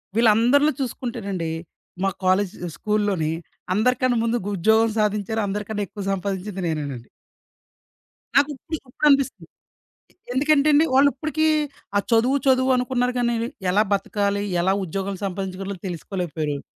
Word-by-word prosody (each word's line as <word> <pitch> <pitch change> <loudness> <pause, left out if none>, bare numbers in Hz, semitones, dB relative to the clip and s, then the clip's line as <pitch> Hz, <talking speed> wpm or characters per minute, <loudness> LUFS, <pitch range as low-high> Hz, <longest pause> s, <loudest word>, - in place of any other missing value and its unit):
వీళ్ళందరిలో 235 +6 +4
చూసుకుంటేనండి, 220 -9 -3 0.5
మా 195 - +3 0.2
కాలేజ్, 190 +2 +2 0.2
స్కూల్‌లోని 205 -7 0 0.4
అందరికన్నా 250 +3 +2
ముందు 230 +1 +1
గుద్యోగం 220 +4 +3
సాధించారు, 210 +1 0
అందరికన్నా 210 +1 -3
ఎక్కువ 205 - -7
సంపాదించింది 195 0 -3
నేనేనండి. 145 -7 -4 1.3
నాకిప్పుడు, 290 +3 +1
ఇప్పుడనిపిస్తుంది. 275 0 +2 0.9
ఎందుకంటేండి. 295 +2 +4
వాళ్ళు 275 +2 +6
ఇప్పటికి 310 +3 -1 0.5
ఆ - - +6
చదువు, 245 +5 +4
చదువు 260 0 +4
అనుకున్నారు 250 0 0
గాని, 240 -1 +1 0.4
ఎలా 200 +3 +4
బతకాలి? 200 0 0 0.2
ఎలా 190 +2 +2
ఉద్యోగం 195 +3 -3
సంపాదించగలాలో 195 0 -4
తెలుసుకోలేకపోయారు. 160 -4 -3
210 Hz, 105 wpm, -23 LUFS, 190-255 Hz, 1.3 s, వాళ్ళు